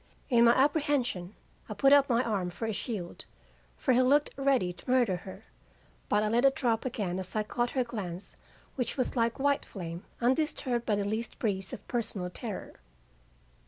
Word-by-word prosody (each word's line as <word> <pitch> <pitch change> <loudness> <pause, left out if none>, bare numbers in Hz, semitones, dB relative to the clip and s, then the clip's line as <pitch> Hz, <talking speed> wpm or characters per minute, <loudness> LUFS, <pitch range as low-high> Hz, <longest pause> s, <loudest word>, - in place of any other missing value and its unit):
In 235 -1 +6
my 235 - +7
apprehension 265 - +1 0.3
I - - -4
put 275 0 +5
up 280 -1 +6
my 240 0 +3
arm 200 -6 -1
for 175 +6 -5
a 220 - -1
shield, 200 -5 -5 0.5
for 260 - +2
he 250 - +5
looked 285 +3 +3
ready 265 -10 +1
to 175 - -13
murder 245 -8 +3
her, 190 +3 -11 0.6
but 210 0 +3
I - - +1
let 235 +3 +2
it 270 0 +5
drop 230 -3 0
again 200 -7 -2
as 185 +2 -5
l 215 - +1
caught 240 +3 -1
her 255 - +4
glance 195 -6 -6 0.4
which 250 +2 -2
was 255 - -1
like 230 -1 +1
white 285 +1 +2
flame 170 -2 -7 0.2
undisturbed 255 -1 0
by 210 - +3
the 200 0 -1
least 220 +3 -3
breeze 195 -4 -2
of 205 - -9
personal 215 -7 -3
terror. 215 +1 -6
230 Hz, 185 wpm, -30 LUFS, 195-255 Hz, 0.6 s, my